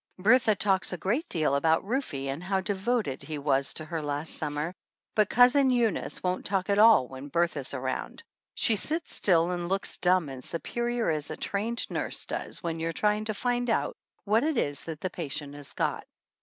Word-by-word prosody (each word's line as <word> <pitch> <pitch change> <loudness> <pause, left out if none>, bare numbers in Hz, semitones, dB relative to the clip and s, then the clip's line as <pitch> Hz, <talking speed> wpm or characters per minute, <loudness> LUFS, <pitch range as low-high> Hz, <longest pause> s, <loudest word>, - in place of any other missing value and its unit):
Bertha 220 +3 +4
talks 190 -1 +1
a 180 - -3
great 235 - -1
deal 155 -5 +1
about 160 +5 +2
Rufe 250 - -2
and 135 +4 -4
how 190 +1 0
devoted 200 - -1
he 155 -1 -5
was 140 -1 +1
to 155 - -5
her 165 0 -4
last 145 +1 -3
summer, 150 +3 -3 0.4
but 210 -2 +3
Cousin 255 +3 +5
Eunice 240 -4 0
won't 180 0 -1
talk 195 0 -1
at 200 - +2
all 215 - +7
when 135 +2 -9
Bertha's 145 -3 -1
around. 130 0 -4 0.3
She 225 - +4
sits 320 - 0
still 175 -2 +3
and 175 -1 -3
looks 195 +1 +1
dumb 180 -3 +2
and 130 -2 -8
superior 235 +4 -2
as 150 -2 -2
a - - -5
trained 220 +4 -2
nurse - - -1
does - - -5
when 165 -1 -3
you 165 +1 -1
are - - -4
trying 210 +2 +1
to 215 -1 -3
find 245 +2 -1
out 225 - 0 0.3
what 220 +1 +2
it 310 -3 0
is 145 -8 -1
that 160 -2 -6
the 185 - -2
patient 145 -4 -4
has 145 -1 -8
got. - - -1
185 Hz, 195 wpm, -28 LUFS, 155-220 Hz, 0.4 s, all